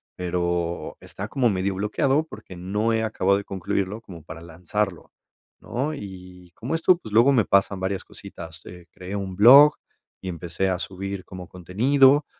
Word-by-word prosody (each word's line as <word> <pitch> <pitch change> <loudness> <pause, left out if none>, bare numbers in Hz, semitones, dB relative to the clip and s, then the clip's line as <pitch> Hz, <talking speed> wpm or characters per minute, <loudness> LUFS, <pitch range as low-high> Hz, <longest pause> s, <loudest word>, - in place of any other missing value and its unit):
pero 85 -1 -2
está 100 +2 -7
como 125 -4 +2
medio 95 0 -1
bloqueado 135 +9 +1
porque 90 - -11
no 105 +5 -1
he 110 - +1
acabado 100 -3 +1
de 100 - -5
concluirlo 100 +3 -3
como 85 -7 -12
para 80 - -10
lanzarlo, 90 +3 -4 0.5
¿no? 140 +6 -3
Y 90 -5 -11
como 130 +8 -3
esto, 170 +2 +4
pues, 110 -11 -11
luego 120 +5 +6
me 115 -6 +3
pasan 100 0 +2
varias 95 0 -2
cositas. 80 -5 -11
Eh, 90 -1 -11
creé 95 +2 -7
un 95 -2 -4
blog 140 +8 +8 0.5
y 95 - -5
empecé 85 +2 -2
a 90 - 0
subir 95 0 -6
como 90 -2 -9
contenido, 130 - +3
95 Hz, 165 wpm, -24 LUFS, 90-110 Hz, 0.5 s, blog